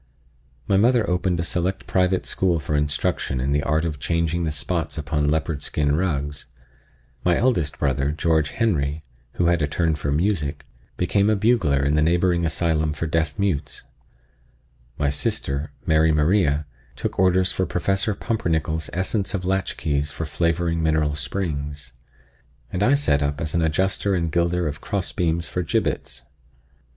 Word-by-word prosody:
My 95 - +3
mother 115 +1 +3
opened 90 -1 0
a - - 0
select 90 +3 -2
private 90 0 +1
school 90 -3 +1
for 75 -1 -3
instruction 75 -2 0
in 65 +3 -1
the 75 +1 +2
art 75 +3 +1
of 75 -4 -3
changing 85 +2 0
the - - 0
spots 80 +3 -2
upon 75 -1 0
leopard 80 -1 -1
skin 75 0 0
rugs; 75 -5 -2 0.8
my 90 -1 +3
eldest 90 - +1
brother, 70 0 0
George 80 -1 +1
Henry, 80 -9 0 0.3
who 90 - 0
had 85 -1 +3
a 75 - +2
turn 80 +2 0
for 75 -1 -2
music, 75 -2 0 0.3
became 100 +1 +2
a 110 - +3
bugler 95 - +2
in 75 +2 +2
a 75 - +3
neighboring 85 +1 +2
asylum 80 -1 0
for 80 - -3
deaf 80 -1 -1
mutes; 85 -8 -2 1.1
my 70 -1 +1
sister, 70 0 -2
Mary 80 0 +4
Maria, 75 -1 +2 0.3
took - - -4
orders 95 0 +3
for 95 - -1
Professor 95 +3 0
Pumpernickel's 80 -8 -1
Essence 95 +2 0
of 90 - -3
Latchkeys 80 -6 -1
for 80 - -4
flavoring 85 +2 0
mineral 80 -2 +1
springs, 75 -4 -3 0.8
and 90 - -1
I 125 +7 +5
set 140 - +2
up 70 0 -1
as 80 -1 -3
an 85 - +2
adjuster 95 +5 +1
and 85 -2 -1
gilder 85 +1 +1
of 75 0 -5
crossbeams 85 -4 -1
for 90 - -2
gibbets. 80 - -2
80 Hz, 155 wpm, -23 LUFS, 75-90 Hz, 1.1 s, I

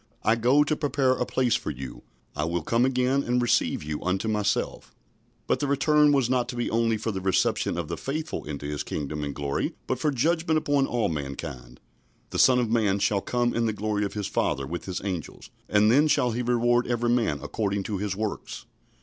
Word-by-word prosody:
"I 110 - +4
go 125 +6 +4
to 155 +1 0
prepare 140 -3 +1
a 125 -1 0
place 125 -2 +1
for - - -1
you." 65 -4 -7 0.3
"I 75 - -1
will 85 0 -2
come 115 +8 +2
again, 130 +1 +1
and 125 -1 0
receive 120 -9 +1
you 75 0 -4
unto 95 +4 -1
myself." 105 -2 -1 0.5
But - - +1
the 145 - -1
return 150 +2 +4
was 135 -4 +3
not 125 -1 0
to - - -4
be 120 - -2
only 115 -1 +2
for 110 - -3
the 95 -2 -4
reception 95 0 +1
of - - -3
the - - -4
faithful 155 +3 -4
into 70 -1 -6
His 75 0 -3
kingdom 75 0 -4
and 70 -1 -4
glory, 70 -1 -2
but 130 - -2
for 150 - +1
judgment 160 +4 +1
upon 145 -3 +1
all 120 -2 0
mankind. 70 -4 -6 0.5
"The - - -2
Son 130 -1 +6
of 120 -3 0
man 105 -4 +2
shall 100 0 +1
come 120 +2 0
in 115 0 +1
the 110 - 0
glory 105 0 -1
of 100 - -3
his 105 -1 -2
Father 70 -6 -1
with 85 +5 -5
his 95 -1 -4
angels; 90 -7 -5 0.2
and 105 +1 +4
then 145 +5 +5
shall 125 -5 +2
he 120 +2 -2
reward 120 0 +2
every 120 0 0
man 115 -12 +1
according 100 +5 -2
to 100 -1 -3
his 100 -1 -2
works." 110 0 -5
115 Hz, 215 wpm, -26 LUFS, 95-125 Hz, 0.5 s, Son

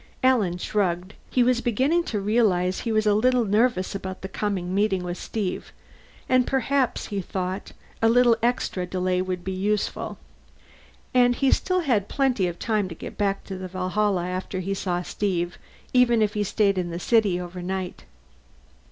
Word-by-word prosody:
Alan 220 -9 +3
shrugged. 185 0 -1 0.2
He 250 - +3
was 245 0 +2
beginning 265 +10 +2
to 210 - -2
realize 195 -4 +2
he 230 - -2
was 215 0 +2
a 210 - +4
little 245 +3 +3
nervous 210 -2 +1
about 190 -1 -6
the - - -3
coming 190 -2 -2
meeting 195 -2 +1
with 175 0 -3
Steve 205 -5 -4 0.6
and 255 -1 +3
perhaps, 265 0 0
he 200 -2 -2
thought, 185 +2 -4 0.3
a 225 - +5
little 240 0 +5
extra 230 -6 0
delay 185 0 0
would 185 -1 -3
be 190 - -3
useful. 200 +2 -2 1.0
And 245 -1 +4
he 270 +1 +2
still 365 -1 +2
had 235 - +1
plenty 255 -9 +1
of 175 -1 -5
time 215 -4 0
to 165 - -7
get - - -8
back 200 -1 0
to 190 -2 -7
the 185 - -5
Valhalla 185 0 0
after 185 +1 -3
he 190 +2 -2
saw 180 -2 -2
Steve, 175 -3 -2 0.3
even 240 -3 +4
if 210 -1 0
he 210 - 0
stayed 200 -1 +1
in 175 -1 -2
the 170 - -4
city 205 -3 +2
overnight. 180 +1 -5
200 Hz, 170 wpm, -25 LUFS, 185-235 Hz, 1.0 s, a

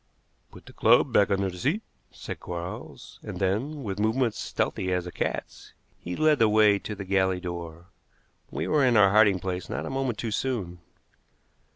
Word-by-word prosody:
"Put - - -14
the - - -14
club - - +4
back 100 -1 +4
under 100 -1 0
the 90 - -10
seat," 170 - 0 0.3
said - - -8
Quarles, 85 0 -8
and - - -7
then, 120 +10 -1
with 100 -3 -4
movements 115 +2 +1
stealthy 95 0 -2
as 90 -1 0
a 90 - -6
cat's, - - -5 0.3
he 90 +1 -5
led 155 -2 +3
the 110 - +5
way 105 -1 +5
to 105 - -6
the 100 -1 -7
galley 95 -1 +1
door. 85 -2 -7 0.6
We - - -3
were 150 -2 +3
in 125 -3 +4
our 100 -2 +6
hiding 105 -2 +5
place 90 0 -4
not - - -3
a - - -5
moment 135 -4 -2
too 115 -1 -3
soon. 105 -8 -2
100 Hz, 185 wpm, -26 LUFS, 90-120 Hz, 0.6 s, our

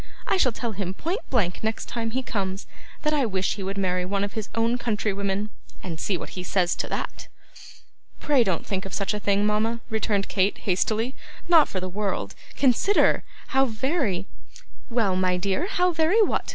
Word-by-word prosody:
I - - +2
shall 260 -9 +4
tell 235 +1 -3
him 190 -2 -4
point 345 - -2
blank 200 -9 0
next 220 0 -1
time 230 -1 -2
he 260 +3 -2
comes, 195 -4 -3 0.4
that 300 - +2
I 290 -2 +3
wish 190 -2 0
he 205 - -6
would 195 +1 -3
marry 180 -2 +1
one 200 +2 -1
of 205 - -3
his 220 -2 -4
own 230 +2 +1
country 215 -3 0
women; 200 +1 -2 0.3
and 165 -4 -5
see 190 +1 0
what - - -7
he 185 - -6
says 180 -1 +1
to - - -1
that.' - - -4 0.9
'Pray 285 -5 +4
don't 185 -6 -1
think 190 -1 -2
of - - -5
such 200 +1 0
a 210 - -2
thing, 205 0 +2
mama,' 215 +2 +1
returned 215 -2 0
Kate, 195 +1 +1
hastily; 220 +6 0 0.3
'not 330 -4 +6
for 190 - -2
the 185 - -3
world. 200 +2 -2 0.2
Consider. 280 - +4 0.3
How 270 0 +4
very 230 - 0 0.3
' - - -25
'Well, 225 -6 +2
my 185 -1 +2
dear, 195 - 0
how 360 -2 +2
very 335 +7 +4
what? - - 0
210 Hz, 195 wpm, -25 LUFS, 190-245 Hz, 0.9 s, not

